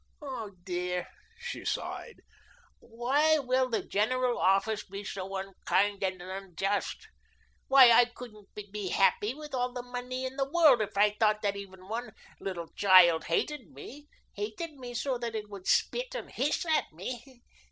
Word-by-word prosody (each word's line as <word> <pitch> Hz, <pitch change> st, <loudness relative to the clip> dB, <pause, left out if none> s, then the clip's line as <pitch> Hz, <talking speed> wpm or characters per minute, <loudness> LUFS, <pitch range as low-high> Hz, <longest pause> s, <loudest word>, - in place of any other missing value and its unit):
Oh, 255 Hz, -8 st, -6 dB
dear," 180 Hz, -1 st, -2 dB, 0.3 s
she 485 Hz, +1 st, -6 dB
sighed, 475 Hz, -, -4 dB, 0.6 s
"why 270 Hz, +7 st, +2 dB
will 255 Hz, -2 st, +1 dB
the 230 Hz, -, -1 dB
General 245 Hz, +4 st, +1 dB
Office 195 Hz, +3 st, +2 dB
be 200 Hz, +1 st, -8 dB
so 195 Hz, 0 st, -5 dB
unkind 195 Hz, +1 st, 0 dB
and 185 Hz, -1 st, -1 dB
unjust? 195 Hz, +2 st, -3 dB, 0.6 s
Why, 265 Hz, -3 st, +8 dB
I 240 Hz, +1 st, +7 dB
couldn't 235 Hz, -4 st, -12 dB, 0.2 s
be 205 Hz, -3 st, -4 dB
happy, 205 Hz, +5 st, +2 dB
with 300 Hz, -1 st, -10 dB
all 250 Hz, -1 st, -1 dB
the 245 Hz, -1 st, -5 dB
money 250 Hz, +1 st, -5 dB
in 260 Hz, +1 st, -6 dB
the 270 Hz, 0 st, -1 dB
world, 300 Hz, -7 st, +5 dB
if 205 Hz, -1 st, -4 dB
I 205 Hz, +1 st, +5 dB
thought 215 Hz, -1 st, +2 dB
that 200 Hz, -1 st, +1 dB
even 190 Hz, -2 st, -10 dB
one 230 Hz, +4 st, -5 dB, 0.3 s
little 175 Hz, -4 st, -5 dB
child 185 Hz, -4 st, +6 dB
hated 250 Hz, -, -1 dB
me 260 Hz, -, -11 dB, 0.3 s
hated 215 Hz, +11 st, -5 dB
me 250 Hz, -3 st, -9 dB
so 255 Hz, 0 st, -1 dB
that 235 Hz, -1 st, -4 dB
it 210 Hz, -1 st, -5 dB
would 195 Hz, -2 st, -9 dB
spit -, -, +1 dB
and -, -, -6 dB
hiss -, -, 0 dB
at 315 Hz, -2 st, +1 dB
me. 240 Hz, -, -8 dB
220 Hz, 160 wpm, -30 LUFS, 195-255 Hz, 0.6 s, Why